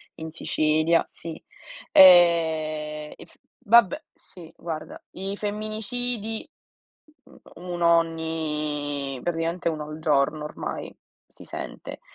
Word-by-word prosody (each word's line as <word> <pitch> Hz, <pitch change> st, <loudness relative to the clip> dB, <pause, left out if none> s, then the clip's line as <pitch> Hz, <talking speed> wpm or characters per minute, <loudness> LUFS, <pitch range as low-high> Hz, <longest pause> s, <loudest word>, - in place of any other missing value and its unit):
in 160 Hz, 0 st, -7 dB
Sicilia 155 Hz, +1 st, +2 dB
sì. 165 Hz, -1 st, -6 dB, 0.5 s
Eh, 160 Hz, -4 st, +5 dB
in -, -, -12 dB, 0.4 s
vabbè 235 Hz, +6 st, +5 dB
sì 165 Hz, -3 st, -12 dB
guarda. 160 Hz, -2 st, -7 dB
I 195 Hz, +2 st, -4 dB
femminicidi, 215 Hz, +2 st, -3 dB, 1.1 s
uno 175 Hz, -1 st, +2 dB
ogni 150 Hz, -4 st, -2 dB
praticamente 170 Hz, +1 st, -2 dB
uno 155 Hz, -2 st, -4 dB
al 155 Hz, +1 st, -7 dB
giorno 150 Hz, 0 st, +1 dB
ormai, 150 Hz, -, -6 dB, 0.3 s
si -, -, -13 dB
sente. -, -, -7 dB
165 Hz, 95 wpm, -25 LUFS, 155-185 Hz, 1.1 s, Eh